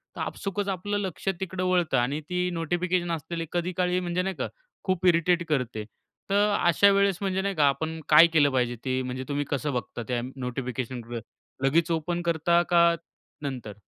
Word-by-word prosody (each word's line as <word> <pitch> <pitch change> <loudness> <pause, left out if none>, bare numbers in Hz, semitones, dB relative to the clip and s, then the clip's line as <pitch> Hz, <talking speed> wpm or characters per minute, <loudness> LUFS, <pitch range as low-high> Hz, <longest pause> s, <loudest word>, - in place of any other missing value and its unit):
तर - - -5
आपसूकच 200 0 -3
आपलं 205 +2 -2
लक्ष 190 -3 -5
तिकडं 185 -1 -3
वळतं 175 -7 +2
आणि 135 +5 0
ती 180 0 0
नोटिफिकेशन 175 +1 -1
असलेली 165 +1 -3
कधी 175 +1 -1
काळी 180 0 +2
म्हणजे 180 0 -1
नाही 190 0 -2
का - - -2 0.4
खूप 185 -1 -1
इरिटेट 170 0 +3
करते. 125 -7 -1 0.5
तर 205 +1 +3
अशा 175 +4 +5
वेळेस 200 -2 +3
म्हणजे 190 -1 0
नाही 200 -1 -2
का 145 -2 +4
आपण 160 +4 -1
काय 155 +2 +9
केलं 145 -3 +5
पाहिजे? 125 -2 0
ते 130 0 0
म्हणजे 130 +1 -4
तुम्ही 145 0 -1
कसं 145 0 -1
बघता 120 0 -4
त्या 120 -1 -1
नोटिफिकेशनकडे? 125 -2 -4 0.5
लगेच 165 +4 +3
ओपन 170 +2 -1
करता 170 +1 +3
का 170 -1 +5 0.5
नंतर? 125 -7 -5
170 Hz, 175 wpm, -27 LUFS, 135-180 Hz, 0.5 s, काय